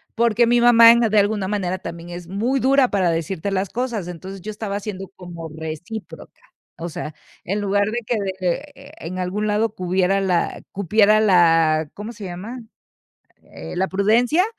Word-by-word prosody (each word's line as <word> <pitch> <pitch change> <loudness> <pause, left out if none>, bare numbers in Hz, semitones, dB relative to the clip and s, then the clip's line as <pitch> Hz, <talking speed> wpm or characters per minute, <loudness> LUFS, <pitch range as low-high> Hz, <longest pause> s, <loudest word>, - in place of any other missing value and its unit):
porque 235 0 +3
mi 240 0 +3
mamá 230 -1 +8
en 235 0 +4
de 215 -2 +3
alguna 205 -1 +1
manera, 185 -3 -1
también 170 -1 -8
es 175 0 -8
muy 225 +9 -1
dura 265 0 +3
para 185 -4 +1
decirte 165 +3 -3
las 190 0 -1
cosas, 235 -5 -3
entonces, 185 +2 -8
yo 215 - -7
estaba 205 -1 -4
siendo 195 -2 -6
como 175 -3 -8
recíproca, 160 +7 -8 0.4
o 170 +1 -4
sea, 155 -1 -6 0.3
en 200 +3 -2
lugar 205 0 +1
de 240 - -1
que 245 - +1
de 195 -2 -2
de 185 +11 -2
eh, 275 +1 -14
en 185 +2 -6
algún 185 +4 -2
lado 215 +1 0
cupiera 185 +2 +1
la 180 -3 0
cupiera 210 +3 +3
la 165 -5 +4
¿cómo 210 +3 -7
se 215 -2 -11
llama?, 200 +8 -7 0.9
eh, - - -8
la 190 +1 0
prudencia, 230 - +3
200 Hz, 175 wpm, -21 LUFS, 180-225 Hz, 0.9 s, mamá